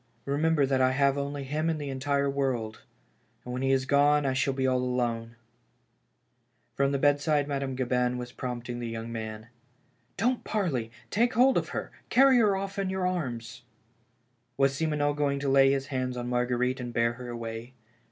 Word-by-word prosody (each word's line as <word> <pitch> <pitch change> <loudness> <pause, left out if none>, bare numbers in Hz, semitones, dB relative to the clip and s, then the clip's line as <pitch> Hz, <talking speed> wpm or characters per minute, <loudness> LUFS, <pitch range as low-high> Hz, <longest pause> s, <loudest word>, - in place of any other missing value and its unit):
Remember 145 +1 +2
that 135 -1 +1
I 130 0 +3
have 140 0 +3
only 140 0 -3
him 155 +4 -1
in 160 - 0
the 145 -2 -4 0.4
world, 125 -6 -2 0.6
and 125 - -5
when 125 - -3
he 135 - +1
is 130 -1 +2
gone 145 +1 +4
I 135 - +1
shall 135 +1 +1
be 130 -1 0
all 130 -1 +2
alone! 120 -2 -2 0.7
" - - -45
From 140 0 +2
the 140 - +1
bedside 145 +1 +2
Madame 140 -2 -2
Gabin 125 -1 0
was 125 0 -6
prompting 120 -1 -5
the 120 -1 -4
young 115 0 -5
man. 110 0 -6 0.3
" 125 -2 -40
Don't 245 +5 +1
parley 155 - -1
— - - -30
take 235 +2 +2
hold 255 +3 +5
of - - 0
her - - -4
— - - -37
carry 265 -1 +6
her 210 -4 +4
off 195 +1 -4
in 195 -1 -1
your 190 -1 -1
arms." 120 -11 -3 1.0
Was 135 0 +3
Simoneau 150 -2 0
going 145 -1 0
to 140 0 -1
lay 135 0 +6
his 135 -1 0
hands 130 -1 -2
on 120 0 -4
Marguerite 125 +1 0
and 120 -1 -5
bear 115 0 +1
her 125 +1 -8
away 115 +1 -6
135 Hz, 190 wpm, -28 LUFS, 125-145 Hz, 1.0 s, carry